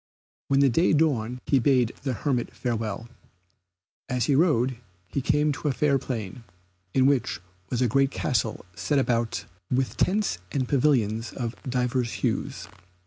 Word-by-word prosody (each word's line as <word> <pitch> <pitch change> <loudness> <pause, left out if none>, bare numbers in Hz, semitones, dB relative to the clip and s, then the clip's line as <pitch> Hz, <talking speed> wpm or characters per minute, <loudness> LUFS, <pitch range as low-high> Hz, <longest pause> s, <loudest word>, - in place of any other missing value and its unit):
When 140 0 +3
the 140 - +6
day 165 +9 +3
dawned 125 -6 +1
he 135 - +3
bade 125 -3 +3
the 135 -3 -1
hermit 125 0 -1
farewell. 115 -3 -3 1.0
As 125 -3 +1
he 140 - +2
rode 135 -5 +3 0.3
he 140 - -2
came 150 +3 +2
to 145 - -3
a - - +3
fair 140 0 +2
plain, 115 -3 -5 0.5
in 130 - +5
which 120 -8 +2 0.3
was 125 0 0
a - - +3
great 135 +4 +3
castle 125 -5 -1
set 90 +11 0
about 120 -3 0 0.2
with 130 0 0
tents 200 - +1
and 130 -3 -1
pavilions 120 -6 +1
of 120 -2 -4
divers 125 -1 0
hues. - - -2
130 Hz, 150 wpm, -26 LUFS, 115-140 Hz, 1.0 s, the